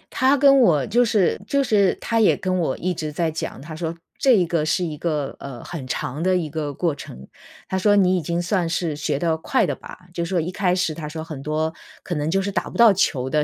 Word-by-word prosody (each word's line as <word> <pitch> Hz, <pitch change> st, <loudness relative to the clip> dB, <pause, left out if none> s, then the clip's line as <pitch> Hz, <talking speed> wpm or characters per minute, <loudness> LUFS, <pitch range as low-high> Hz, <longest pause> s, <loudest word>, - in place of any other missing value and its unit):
他 265 Hz, +2 st, +4 dB
跟 275 Hz, 0 st, +6 dB
我 155 Hz, -, +4 dB
就 240 Hz, +3 st, +3 dB
是 210 Hz, -6 st, +1 dB
就 280 Hz, 0 st, +2 dB
是 205 Hz, -6 st, +3 dB
他 230 Hz, -1 st, -1 dB
也 215 Hz, -, +4 dB
跟 185 Hz, -2 st, -1 dB
我 155 Hz, -6 st, -1 dB
一 180 Hz, +1 st, -1 dB
直 155 Hz, -2 st, -4 dB
在 160 Hz, +1 st, -1 dB
讲， 160 Hz, -, -5 dB
他 155 Hz, +2 st, -8 dB
说 165 Hz, 0 st, -4 dB, 0.2 s
这 260 Hz, -6 st, +5 dB
一 180 Hz, -, +3 dB
个 165 Hz, -2 st, 0 dB
是 170 Hz, +4 st, 0 dB
一 155 Hz, -3 st, -4 dB
个， 150 Hz, -4 st, -2 dB
呃， 135 Hz, -4 st, -8 dB
很 150 Hz, -7 st, -7 dB
长 135 Hz, +4 st, -3 dB
的 185 Hz, +1 st, +2 dB
一 160 Hz, -4 st, -3 dB
个 155 Hz, -2 st, -3 dB
过 160 Hz, +2 st, -1 dB
程。 65 Hz, -, -10 dB, 0.4 s
他 190 Hz, -, -1 dB
说 205 Hz, +2 st, +4 dB
你 185 Hz, -2 st, +4 dB
已 180 Hz, -, 0 dB
经 170 Hz, +2 st, -2 dB
算 175 Hz, -1 st, 0 dB
是 165 Hz, -2 st, -1 dB
学 145 Hz, -1 st, -1 dB
得 165 Hz, +1 st, +1 dB
快 -, -, +1 dB
的 -, -, -1 dB
吧， -, -, -11 dB, 0.2 s
就 170 Hz, -, -2 dB
是 170 Hz, -, -4 dB
说 185 Hz, -, +1 dB
一 170 Hz, +2 st, -2 dB
开 185 Hz, -1 st, +1 dB
始 180 Hz, -4 st, 0 dB
他 150 Hz, -1 st, -6 dB
说 160 Hz, 0 st, -6 dB
很 155 Hz, -4 st, -8 dB
多 155 Hz, +2 st, -1 dB, 0.3 s
可 175 Hz, -, -4 dB
能 150 Hz, -1 st, -1 dB
就 195 Hz, +3 st, +1 dB
是 200 Hz, -, -2 dB
打 -, -, -2 dB
不 -, -, -8 dB
到 230 Hz, -3 st, +7 dB
球 135 Hz, -8 st, 0 dB
的 150 Hz, +2 st, +1 dB
170 Hz, 275 characters per minute, -22 LUFS, 155-190 Hz, 0.4 s, 到